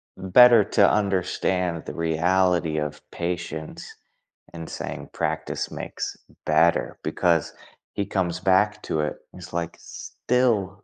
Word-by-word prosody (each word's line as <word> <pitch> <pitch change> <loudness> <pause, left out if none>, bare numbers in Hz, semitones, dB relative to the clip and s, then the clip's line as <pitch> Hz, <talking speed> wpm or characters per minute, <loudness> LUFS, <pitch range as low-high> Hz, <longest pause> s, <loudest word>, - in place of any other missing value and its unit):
better 115 +4 +6
to - - +3
understand 90 -3 0
the - - -5
reality 85 0 +1
of 75 0 -3
patience 85 -2 -5 0.6
and 80 -1 -8
saying - - -6
practice - - -3
makes - - -5 0.3
better 80 +2 +2
because 85 -4 +1 0.4
he 100 - -2
comes 90 -4 -2
back 105 +3 +2
to 80 - -2
it. 75 - -1 0.2
It's, 90 -1 -11
like, 85 -1 -3
still, 105 -6 -1
90 Hz, 115 wpm, -24 LUFS, 85-95 Hz, 0.6 s, better